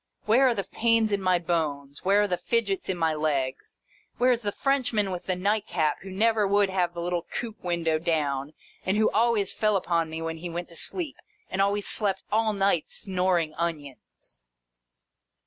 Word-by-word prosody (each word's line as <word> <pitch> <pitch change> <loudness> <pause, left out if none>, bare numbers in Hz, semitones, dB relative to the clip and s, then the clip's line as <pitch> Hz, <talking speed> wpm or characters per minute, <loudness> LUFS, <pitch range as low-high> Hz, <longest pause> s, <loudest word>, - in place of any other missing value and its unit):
Where 245 +5 +5
are 245 - +2
the 200 - -1
pains 225 +2 +1
in 200 -1 0
my 185 -1 +3
bones, 150 -5 -2
where 200 +2 +4
are - - +1
the 180 - 0
fidgets 200 -1 -1
in 185 - 0
my 165 -2 +1
legs, 140 -4 -2 0.4
where 250 +1 +4
is 240 -1 +1
the 205 -2 -1
Frenchman 245 -6 +1
with 180 -1 -6
the 185 - +1
nightcap 180 -5 0
who 195 - -9
never 215 +2 +2
would 200 0 +3
have 175 -2 0
the 170 - -4
little 175 0 -1
coupe 225 -3 -5
window 170 -3 0
down, 150 -4 -1 0.3
and 190 +2 0
who 220 - +3
always 225 -4 +2
fell 215 -1 +1
upon 170 -4 0
me 160 +1 -5
when 165 0 -4
he 175 +2 -6
went 175 +1 -5
to 170 - -14
sleep, 315 - -3 0.3
and 190 - 0
always 200 +1 +1
slept 200 -3 0
all 220 +1 +2
night 195 -5 +1
snoring 180 -4 0
onions 145 - -6
185 Hz, 185 wpm, -26 LUFS, 165-210 Hz, 0.4 s, Where